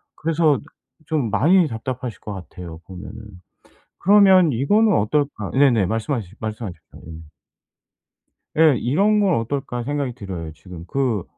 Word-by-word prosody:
그래서 155 -2 +1 0.5
좀 150 -6 -1
많이 170 - +4
답답하실 125 -1 -5
것 105 - -6
같아요 90 -3 -9
보면은. 95 0 -9 0.9
그러면 190 -4 +5
이거는 205 - +3
어떨까 140 +7 -1
네네. 130 -7 +3
말씀하시 110 -1 -3
말씀하십시오. 105 -7 -7
예. 80 - -8 1.4
예. 160 -4 +6
이런 200 - +2
건 195 -4 +3
어떨까 125 +1 -3
생각이 140 -2 -2
들어요. 90 -8 -7
지금 85 +2 -11
그 120 -4 -1
125 Hz, 290 characters per minute, -21 LUFS, 100-155 Hz, 1.4 s, 예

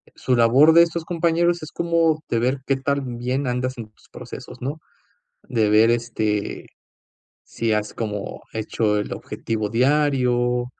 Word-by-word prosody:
Su 130 - 0
labor 130 +7 +6
de 170 0 +8
estos 170 -1 -3
compañeros 170 0 +1
es 155 - -8
como 165 -2 +1
de 115 - +1
ver 130 +3 0
qué 135 - +2
tan 135 -3 -2
bien 130 +3 -2
andas 125 +1 -2
en 110 -2 -8
tus - - -26
procesos, 125 0 -10
¿no?, 145 +5 -4 0.7
de 110 -4 +1
ver, 110 +2 +5
este, 110 -3 -2 0.8
si 115 -1 -2
has 105 0 -2
como 105 -3 -5
hecho 110 -1 0
el - - -4
objetivo 110 -2 -4
diario, 125 -1 +2
125 Hz, 150 wpm, -22 LUFS, 115-150 Hz, 0.8 s, de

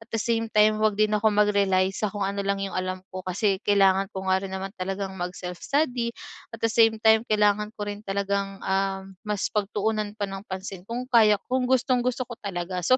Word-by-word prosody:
At 225 - -16
the - - +1
same 225 0 0
time 215 0 +4
huwag 215 -2 +2
din 215 0 +2
ako 215 +1 +3
mag-rely 200 -2 +2
sa 210 - -1
kung 200 0 -3
ano 200 +1 -2
lang 200 0 -1
'yong 195 - -5
alam 185 0 -3
ko. 185 - -5
Kasi 190 +2 0
kailangan 195 -2 +3
ko 190 0 -6
nga 190 0 +2
rin 195 0 -6
naman 195 0 -5
talagang 195 +1 -3
mag-self-study. 235 - -2 0.5
At 225 - -6
the 225 - +2
same 225 -1 +5
time 220 +1 +5
kailangan 210 0 +2
ko 205 - -3
rin 205 0 -5
talagang, 200 -1 -2
ah, 195 0 0 0.2
mas 210 -2 -2
pagtuunan 210 0 -1
pa 205 - -2
ng 195 0 -7
pansin 190 0 -6
kung 240 +2 -3
kaya 215 -3 +6
kung 255 0 0
gustong-gusto 255 -1 +1
ko 240 - -8
talaga. 180 -2 -4
So, 255 +9 +4
205 Hz, 205 wpm, -25 LUFS, 195-220 Hz, 0.5 s, kaya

